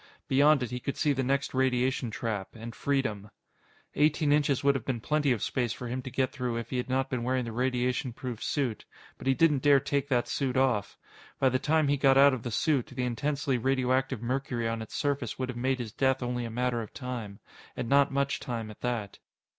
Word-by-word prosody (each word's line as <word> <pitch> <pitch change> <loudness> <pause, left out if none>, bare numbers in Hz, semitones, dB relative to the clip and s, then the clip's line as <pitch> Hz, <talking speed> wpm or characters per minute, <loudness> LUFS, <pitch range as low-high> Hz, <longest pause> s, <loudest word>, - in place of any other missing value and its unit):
Beyond 140 +1 +4
it, 125 - -4
he 125 - -3
could 140 - -4
see 150 -2 +2
the 135 - -1
next 140 +2 0
radiation 130 -1 +1
trap 110 -3 -4
and 115 +1 -8
freedom. 110 -8 -1 0.6
Eighteen 150 0 +2
inches 145 -3 +2
would 140 0 +5
have 135 -5 -3
been 130 -2 -2
plenty 150 +2 +1
of 115 -5 0
space 120 -3 -1
for 125 - -7
him 125 +2 -3
to 130 - -7
get 130 +1 0
through 125 -4 -3
if 115 0 -6
he 130 - -1
had 125 +1 -3
not 130 +1 +1
been 130 -3 -2
wearing 125 +1 0
the 115 - -5
radiation 125 +1 0
proof 120 -1 -6
suit. 130 -7 -1 0.4
But - - -6
he 135 - +4
didn't 150 -4 +3
dare 145 -1 +6
take 140 0 -1
that 125 -3 +1
suit 130 -2 -1
off. 130 -6 +1 0.4
By 135 - +3
the 130 0 0
time 155 +1 +2
he 145 0 +2
got 135 -1 +4
out 140 0 +7
of 130 - -3
the 120 - -4
suit, 135 +3 +1
the 130 -1 -4
intensely 135 +2 -1
radioactive 130 -1 0
mercury 125 -2 -1
on 115 0 -2
its 110 - -8
surface 140 -6 -1
would 130 -1 -3
have 125 - -4
made 130 +1 +1
his 120 -4 -5
death 130 +2 +1
only 125 0 -2
a - - -4
matter 120 +1 -1
of 110 - -9
time. 120 -6 -6 0.4
And - - -3
not 140 +2 +4
much 140 +1 0
time 115 -5 -4
at 105 - -15
that. 115 -5 -3
130 Hz, 225 wpm, -29 LUFS, 120-140 Hz, 0.6 s, out